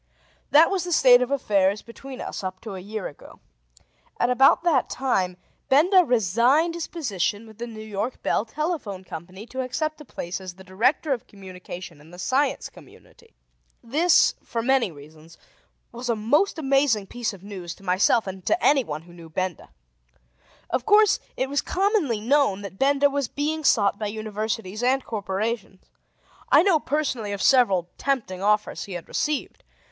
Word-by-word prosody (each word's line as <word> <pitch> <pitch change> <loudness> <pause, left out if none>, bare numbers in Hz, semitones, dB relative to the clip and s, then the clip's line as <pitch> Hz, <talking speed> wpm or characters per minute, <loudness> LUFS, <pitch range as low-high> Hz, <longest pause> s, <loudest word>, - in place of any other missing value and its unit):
That 315 +5 +6
was 380 -3 0
the 355 - -5
state 250 -6 +6
of 250 - 0
affairs 205 -7 +1
between 260 +3 -10
us - - -6
up 185 0 -5
to 220 -3 -7
a 190 - -6
year 205 +2 -5
ago. 145 - -14 0.8
At 245 - +2
about 270 +6 +5
that 320 -7 +2
time 190 -9 -1 0.3
Benda 360 +7 +5
resigned 245 - +2
his 340 -1 -4
position 210 - -2
with 220 -1 -16
the 240 - -4
New 220 -2 -9
York 215 +3 -4
Bell - - +1
Telephone 235 - -4
Company 185 +4 -9
to 260 +2 -5
accept 310 +4 -3
a - - -8
place 185 -8 -6
as 185 -2 -8
the 190 - -14
Director 245 - +1
of 245 - -6
Communication 180 -4 -10
in 155 - -17
the 175 - -13
Science 265 +10 0
Community. 460 -1 -19 0.5
This, 310 +9 +4
for 230 -1 -3
many 260 -5 +2
reasons, 155 +2 -15 0.5
was 240 +1 -6
a 235 - +2
most 285 - +1
amazing 270 -7 +2
piece 240 +2 -3
of 195 -3 -13
news 185 -4 -7
to - - -19
myself 195 +5 +3
and 190 -1 -7
to 330 - +2
anyone 235 - +2
who 175 0 -16
knew 170 -2 -12
Benda. 185 +1 -4 1.0
Of 245 - 0
course, 420 +6 +5 0.2
it 260 - 0
was 285 +1 0
commonly 380 - 0
known 235 -4 +2
that 195 -1 -9
Benda 280 +1 +4
was 280 -2 -1
being 310 +4 -2
sought 200 -7 +3
by 215 - -2
Universities 215 -1 -4
and 260 +2 +1
corporations: 205 -1 -4 0.6
I - - +7
know 365 -5 +4
personally 260 -8 -2
of 200 - -4
several 195 -10 +3
tempting 220 -10 -2
offers 210 +1 0
he 200 - -8
had 175 -2 -7
received. 300 -2 -2
230 Hz, 170 wpm, -24 LUFS, 190-280 Hz, 1.0 s, I